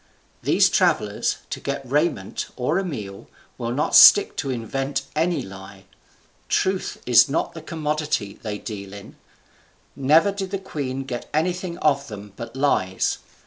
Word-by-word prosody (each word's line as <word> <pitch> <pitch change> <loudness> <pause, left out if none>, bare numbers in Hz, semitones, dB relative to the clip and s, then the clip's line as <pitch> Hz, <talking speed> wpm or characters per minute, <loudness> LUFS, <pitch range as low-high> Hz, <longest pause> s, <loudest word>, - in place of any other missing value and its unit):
These - - +4
travellers, - - +1
to - - -3
get 140 -1 -4
raiment 145 - -1
or 150 +8 0
a - - -2
meal, 105 - -6 0.3
will 115 - -3
not 135 +5 -1
stick 205 - +8
to 140 - -2
invent 135 +3 -2
any 160 -2 0
lie. 95 0 -11 0.6
Truth 190 0 -1
is 125 +3 +6
not 160 +4 -1
the 165 - -8
commodity 150 - -3
they 105 -2 -4
deal 100 -3 -8
in. 100 -1 -11 0.8
Never 155 +8 +4
did 195 -1 -5
the 195 - -2
queen 135 -8 -4
get 125 -2 -6
anything 175 +2 -1
of 140 -4 +1
them 105 -2 -9
but 115 +1 -8
lies. 115 -9 0
135 Hz, 145 wpm, -23 LUFS, 110-160 Hz, 0.8 s, stick